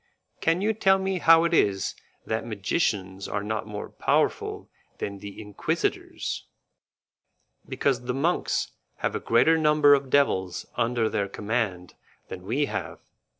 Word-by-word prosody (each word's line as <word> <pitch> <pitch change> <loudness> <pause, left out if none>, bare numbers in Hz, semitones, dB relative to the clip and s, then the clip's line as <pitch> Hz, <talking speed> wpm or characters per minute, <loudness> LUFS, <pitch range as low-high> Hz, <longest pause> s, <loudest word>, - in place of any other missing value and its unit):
Can 165 +3 +1
you 215 +2 +2
tell 195 -2 +4
me 190 -1 -1
how 165 0 +6
it 170 - 0
is 100 - +2 0.3
that 110 0 -2
magicians 100 - -2
are 100 - -3
not 110 +1 -3
more 105 -1 -6
powerful - - 0 0.3
than 100 -1 -5
the 100 0 -9
Inquisitors?" 105 -2 -3 1.2
"Because 125 -3 0
the 125 - -1
monks 165 +6 0 0.3
have - - 0
a - - -2
greater 160 +8 +3
number 150 -2 +5
of 140 -1 +1
devils 95 -11 +1
under 115 -1 +1
their 100 -2 -1
command 100 -4 -3 0.4
than 90 - -7
we 140 +7 +1
have. - - -5
115 Hz, 140 wpm, -26 LUFS, 100-155 Hz, 1.2 s, how